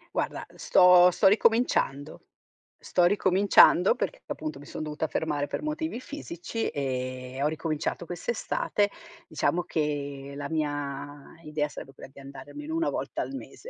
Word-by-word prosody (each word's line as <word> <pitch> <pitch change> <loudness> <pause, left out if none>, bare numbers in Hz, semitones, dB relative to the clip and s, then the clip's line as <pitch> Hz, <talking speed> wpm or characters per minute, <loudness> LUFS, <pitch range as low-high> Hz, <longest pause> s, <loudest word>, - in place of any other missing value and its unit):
Guarda, - - -2
sto 180 -1 +7
sto 180 +3 -1
ricominciando, 195 - +2 0.5
sto 180 - +1
ricominciando 190 -1 +5
perché, - - -3
appunto, 155 -3 -5
mi 145 - -13
son - - -6
dovuta 155 +1 -3
fermare 150 -2 -1
per 215 - -4
motivi 305 -4 -3
fisici 230 - -5
e 130 -1 -4
ho 145 - +3
ricominciato 155 +2 -3
quest'estate. 205 +2 -1 0.4
Diciamo 170 +2 0
che 145 -3 -3
la 140 0 -4
mia 145 -2 -4
idea 150 -1 -1
sarebbe 135 -2 -10
quella 135 - -12
di - - -13
andare 140 0 -11
almeno 295 +2 -6
1 330 0 +1
volta - - -3
al - - -7
mese, 275 - -9
155 Hz, 145 wpm, -27 LUFS, 145-195 Hz, 0.5 s, sto